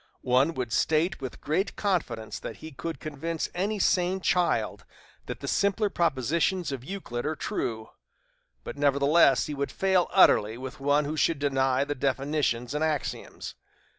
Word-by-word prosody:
One 130 Hz, +6 st, +3 dB
would 125 Hz, -4 st, -3 dB
state 160 Hz, +2 st, +1 dB
with 130 Hz, -2 st, -7 dB
great 175 Hz, +7 st, -1 dB
confidence 140 Hz, -, -2 dB
that -, -, -7 dB
he 160 Hz, -, -10 dB
could 165 Hz, +4 st, -6 dB
convince 155 Hz, +2 st, -4 dB
any 200 Hz, +4 st, -1 dB
sane 185 Hz, -1 st, +2 dB
child 180 Hz, -1 st, 0 dB, 0.4 s
that -, -, -6 dB
the -, -, -5 dB
simpler 200 Hz, +1 st, +1 dB
propositions 170 Hz, +2 st, 0 dB
of 130 Hz, -3 st, -5 dB
Euclid 130 Hz, -8 st, -5 dB
are 155 Hz, +1 st, -1 dB
true; 110 Hz, -5 st, -3 dB, 0.7 s
but, -, -, -7 dB
nevertheless, 140 Hz, +1 st, +4 dB
he 150 Hz, -, -4 dB
would 140 Hz, 0 st, -3 dB
fail, 190 Hz, -2 st, +2 dB
utterly, 110 Hz, -, +5 dB
with 130 Hz, +1 st, -8 dB
one 145 Hz, +2 st, +2 dB
who 150 Hz, +2 st, -3 dB
should 155 Hz, +1 st, +2 dB
deny 135 Hz, -2 st, +1 dB
the 145 Hz, +1 st, -2 dB
definitions 135 Hz, -2 st, -1 dB
and 150 Hz, +1 st, -1 dB
axioms. 155 Hz, -2 st, -3 dB
150 Hz, 155 wpm, -27 LUFS, 135-170 Hz, 0.7 s, utterly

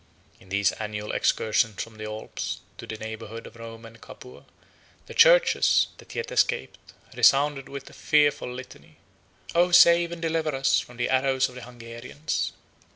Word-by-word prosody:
In 95 Hz, -, -19 dB
these 100 Hz, 0 st, +2 dB
annual 105 Hz, -1 st, -5 dB
excursions 110 Hz, -2 st, +1 dB
from 115 Hz, -1 st, -14 dB
the 110 Hz, -, -5 dB
Alps 110 Hz, 0 st, -5 dB, 0.2 s
to -, -, -9 dB
the 110 Hz, -, -6 dB
neighborhood 110 Hz, +1 st, -8 dB
of -, -, -12 dB
Rome 115 Hz, 0 st, -10 dB
and 115 Hz, 0 st, -14 dB
Capua, 125 Hz, -, -13 dB, 0.6 s
the -, -, -10 dB
churches, -, -, +5 dB
that -, -, -13 dB
yet 470 Hz, 0 st, -4 dB
escaped, 475 Hz, +1 st, 0 dB, 0.4 s
resounded 140 Hz, 0 st, +3 dB
with 140 Hz, 0 st, -8 dB
a -, -, -13 dB
fearful 145 Hz, -4 st, +2 dB
litany: 125 Hz, +1 st, -11 dB, 0.6 s
"O, 175 Hz, +1 st, +3 dB
save 170 Hz, 0 st, +6 dB
and 170 Hz, -, -6 dB
deliver 160 Hz, -2 st, -1 dB
us 135 Hz, -7 st, +2 dB
from 120 Hz, +5 st, -10 dB
the 120 Hz, -, -1 dB
arrows 130 Hz, 0 st, +2 dB
of -, -, -14 dB
the 125 Hz, -, -9 dB
Hungarians!" 120 Hz, +4 st, -5 dB
125 Hz, 160 wpm, -25 LUFS, 110-150 Hz, 0.6 s, save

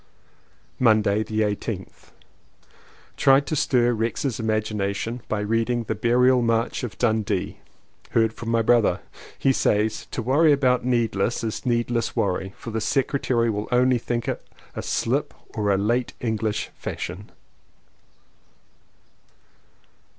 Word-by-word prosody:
Monday 110 Hz, -3 st, +3 dB
the 110 Hz, 0 st, -2 dB
18th. 105 Hz, -1 st, -4 dB, 1.1 s
Tried 135 Hz, +1 st, +5 dB
to 155 Hz, -, -2 dB
stir 120 Hz, -4 st, +2 dB
Rex's 115 Hz, +3 st, -2 dB
imagination 110 Hz, +1 st, -2 dB
by 105 Hz, -1 st, -1 dB
reading 115 Hz, +3 st, 0 dB
The 110 Hz, -, -2 dB
Burial 125 Hz, +3 st, +3 dB
March 115 Hz, +1 st, 0 dB
of 120 Hz, -, -5 dB
Dundee. 110 Hz, -4 st, 0 dB, 0.5 s
Heard 110 Hz, -1 st, +2 dB
from 115 Hz, -, -7 dB
my 115 Hz, 0 st, +2 dB
brother; 110 Hz, -6 st, +3 dB, 0.4 s
he 135 Hz, -, +2 dB
says: 105 Hz, -2 st, 0 dB
"To 120 Hz, -, -4 dB
worry 145 Hz, +6 st, +4 dB
about 130 Hz, -3 st, +2 dB
'neadless' 120 Hz, -3 st, 0 dB
is 115 Hz, +3 st, -4 dB
needless 120 Hz, -1 st, 0 dB
worry, 95 Hz, -1 st, -1 dB
for 115 Hz, -, -7 dB
the 110 Hz, 0 st, -2 dB
Secretary 120 Hz, -1 st, +1 dB
will 105 Hz, 0 st, -3 dB
only 125 Hz, 0 st, +3 dB
think 120 Hz, 0 st, -3 dB
it -, -, -3 dB, 0.3 s
a -, -, -3 dB
slip -, -, -1 dB, 0.2 s
or 105 Hz, -2 st, -1 dB
a 95 Hz, -, +3 dB
late 120 Hz, +5 st, 0 dB
English 110 Hz, -2 st, -2 dB
fashion!" 90 Hz, +4 st, -6 dB
115 Hz, 125 wpm, -24 LUFS, 110-125 Hz, 1.1 s, Tried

